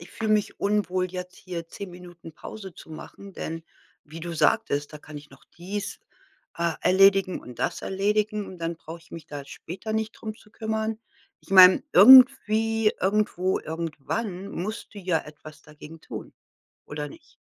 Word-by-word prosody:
„Ich 170 Hz, -, -13 dB
fühle 220 Hz, -1 st, -1 dB
mich 210 Hz, -1 st, 0 dB
unwohl 185 Hz, -3 st, 0 dB
jetzt 180 Hz, 0 st, -7 dB
hier 175 Hz, -2 st, -7 dB
10 195 Hz, +2 st, -8 dB
Minuten 175 Hz, -2 st, -12 dB
Pause 190 Hz, +3 st, -10 dB
zu -, -, -14 dB
machen“, 195 Hz, +5 st, -10 dB
denn 165 Hz, -2 st, -6 dB, 0.4 s
wie 160 Hz, +2 st, -10 dB
du 170 Hz, +1 st, -5 dB
sagtest, 145 Hz, -1 st, +1 dB
„da 150 Hz, -, -8 dB
kann 150 Hz, 0 st, -11 dB
ich 145 Hz, 0 st, -11 dB
noch 135 Hz, -, -18 dB
dies, 200 Hz, +4 st, -5 dB, 0.6 s
äh, 170 Hz, -1 st, 0 dB
erledigen 195 Hz, 0 st, +4 dB
und 125 Hz, -, -12 dB
das -, -, -2 dB
erledigen 210 Hz, +2 st, 0 dB
und 185 Hz, -, -10 dB
dann 165 Hz, 0 st, -3 dB
brauche 165 Hz, +1 st, -10 dB
ich 165 Hz, -, -23 dB
mich 165 Hz, -, -9 dB
da 145 Hz, -1 st, -7 dB
später 185 Hz, +9 st, -7 dB
nicht 220 Hz, 0 st, -1 dB
drum 215 Hz, -1 st, -7 dB
zu 210 Hz, -, -21 dB
kümmern.“ 220 Hz, 0 st, -3 dB, 0.4 s
Ich -, -, -21 dB
meine, 185 Hz, -1 st, +8 dB
irgendwie, 225 Hz, -1 st, +7 dB
irgendwo, 190 Hz, -2 st, +1 dB
irgendwann 170 Hz, +5 st, -4 dB
musst 215 Hz, +5 st, -6 dB
du 205 Hz, -, -8 dB
ja 180 Hz, -3 st, 0 dB
etwas 150 Hz, 0 st, -13 dB
dagegen 150 Hz, +1 st, -13 dB
tun -, -, -9 dB, 0.5 s
oder 150 Hz, 0 st, -5 dB
nicht? -, -, -17 dB
185 Hz, 170 wpm, -25 LUFS, 165-210 Hz, 0.6 s, meine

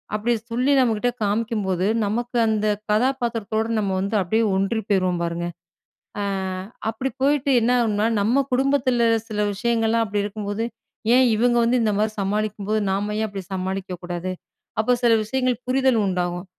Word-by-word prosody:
அப்பிடி 230 Hz, +3 st, +1 dB, 0.2 s
சொல்லி 250 Hz, +4 st, +1 dB
நம்மக்கிட்ட 245 Hz, -1 st, +2 dB
காமிக்கும்போது, 205 Hz, -3 st, 0 dB, 0.2 s
நமக்கு 240 Hz, +3 st, -2 dB
அந்த 215 Hz, -1 st, 0 dB, 0.3 s
கதாபாத்திரத்தோட 230 Hz, -2 st, 0 dB
நம்ம 200 Hz, -2 st, -1 dB
வந்து 200 Hz, +3 st, -2 dB
அப்பிடியே 220 Hz, +5 st, +1 dB
ஒன்றி 195 Hz, +4 st, 0 dB
போயிருவோம் 185 Hz, -3 st, +1 dB
பாருங்க. 170 Hz, 0 st, -3 dB, 0.8 s
அ -, -, -1 dB, 0.7 s
அப்பிடி 255 Hz, +4 st, -2 dB
போயிட்டு 280 Hz, -1 st, +2 dB
என்னாகும்ன்னா, 225 Hz, -3 st, +2 dB
நம்ம 240 Hz, +7 st, +3 dB
குடும்பத்துல 260 Hz, -2 st, +2 dB, 0.2 s
சில 210 Hz, -1 st, -4 dB
விஷயங்கள்லாம் 230 Hz, +1 st, +1 dB
அப்பிடி 205 Hz, 0 st, -1 dB
இருக்கும்போது, 205 Hz, +1 st, -3 dB, 0.5 s
"ஏன் 260 Hz, -, +6 dB
இவுங்க 240 Hz, +2 st, +2 dB
வந்து 240 Hz, +2 st, +2 dB
இந்தமாரி 215 Hz, 0 st, +1 dB
சமாளிக்கும்போது, 210 Hz, +1 st, -1 dB
நாம 205 Hz, +2 st, -1 dB
ஏன் 220 Hz, -, +1 dB
அப்பிடி 195 Hz, -2 st, -6 dB
சமாளிக்க 190 Hz, 0 st, -3 dB
கூடாது?" 175 Hz, +1 st, -4 dB, 0.5 s
அப்போ 235 Hz, -, 0 dB
சில 235 Hz, -1 st, +5 dB
விஷயங்கள் 255 Hz, +1 st, 0 dB
புரிதல் 260 Hz, -1 st, +3 dB
உண்டாவும். 175 Hz, 0 st, -2 dB
220 Hz, 135 wpm, -23 LUFS, 200-240 Hz, 0.8 s, ஏன்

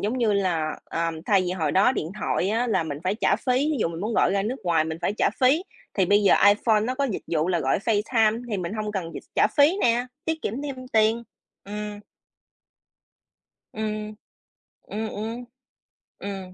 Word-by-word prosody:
giống 225 Hz, +5 st, -1 dB
như 225 Hz, -4 st, +2 dB
là, 175 Hz, -6 st, 0 dB
ờ, 165 Hz, 0 st, -2 dB, 0.2 s
thay 200 Hz, -2 st, +4 dB
vì 180 Hz, -, -2 dB
hồi 160 Hz, -5 st, -1 dB
đó 205 Hz, +7 st, +4 dB
điện 165 Hz, -6 st, -3 dB
thoại 190 Hz, -, 0 dB
á 230 Hz, +3 st, +1 dB
là 220 Hz, -, +1 dB
mình 145 Hz, -2 st, -5 dB
phải 185 Hz, +3 st, +1 dB
trả 225 Hz, -, +2 dB
phí, 255 Hz, -, -1 dB, 0.2 s
ví 295 Hz, -, -1 dB
dụ -, -, +2 dB
mình 165 Hz, 0 st, -6 dB
muốn 215 Hz, +3 st, -2 dB
gọi -, -, +3 dB
ra 195 Hz, 0 st, +1 dB
nước 240 Hz, +6 st, -2 dB
ngoài 165 Hz, -3 st, +2 dB
mình 160 Hz, 0 st, -4 dB
phải -, -, +1 dB
trả -, -, +3 dB
phí, 270 Hz, +7 st, +4 dB, 0.3 s
thì 195 Hz, -, +3 dB
bây 205 Hz, +2 st, +4 dB
giờ 195 Hz, -, +6 dB
iPhone 215 Hz, +1 st, +3 dB
nó 250 Hz, +4 st, -1 dB
có 280 Hz, -, 0 dB
dịch 230 Hz, -8 st, -3 dB
vụ 160 Hz, +1 st, 0 dB
là 175 Hz, -3 st, +1 dB
gọi 135 Hz, -, +1 dB
Facetime 220 Hz, +1 st, +1 dB
thì 205 Hz, -, 0 dB
mình 180 Hz, 0 st, -4 dB
hông 215 Hz, -1 st, -3 dB
cần 175 Hz, -4 st, -4 dB
dịch -, -, -6 dB
trả -, -, +5 dB
phí 295 Hz, +6 st, +5 dB
nè, 240 Hz, +1 st, +2 dB, 0.2 s
tiết 320 Hz, -1 st, -2 dB
kiệm 250 Hz, +7 st, -3 dB
thêm 260 Hz, -3 st, -6 dB
tiền, 220 Hz, +1 st, +2 dB, 0.4 s
ừm. 210 Hz, 0 st, -6 dB, 1.7 s
Ừm. 215 Hz, 0 st, -4 dB, 0.7 s
Ừm, 220 Hz, +1 st, -4 dB
ừm. 225 Hz, +4 st, -5 dB, 0.7 s
Ừm. 195 Hz, -2 st, -6 dB
210 Hz, 205 wpm, -25 LUFS, 185-235 Hz, 1.7 s, giờ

